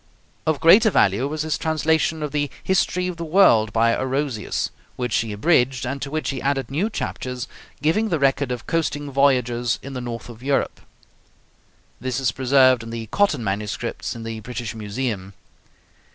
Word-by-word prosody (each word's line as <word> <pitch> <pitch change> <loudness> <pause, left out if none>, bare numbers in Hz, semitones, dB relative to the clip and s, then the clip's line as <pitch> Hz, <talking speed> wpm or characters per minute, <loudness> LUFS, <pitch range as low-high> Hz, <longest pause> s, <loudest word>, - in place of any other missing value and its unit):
Of 155 -2 +1
greater 200 +8 +7
value 105 - +2
was 155 +1 -3
his 155 -1 -1
translation 160 0 +1
of 150 - -3
the 145 -1 -1
'History 185 -1 +1
of 180 -2 -4
the 170 - -4
World,' 155 - +4
by 115 +1 +3
Orosius, 130 -3 -2 0.2
which 125 -3 -2
he 115 -1 -1
abridged, 125 +2 +2
and 135 +2 -4
to 140 - -4
which 155 +1 -2
he 130 - -5
added 135 -3 -1
new 175 +10 0
chapters 125 - -4 0.4
giving 210 +9 +2
the 165 - +1
record 140 -1 +1
of 125 -1 -4
coasting 145 -3 -1
voyages 125 -4 +2
in 135 - -7
the 125 - -4
north 120 -1 -6
of 120 -1 -11
Europe. 135 +1 -1 1.2
This 130 0 -2
is 130 -3 +1
preserved 130 -1 +4
in 115 - -8
the 115 0 -5
Cotton 200 -11 +2
MSS. 100 +3 -3
in 115 - -7
the 115 -1 -5
British 120 0 -5
Museum. 105 -2 -4
130 Hz, 170 wpm, -22 LUFS, 115-155 Hz, 1.2 s, greater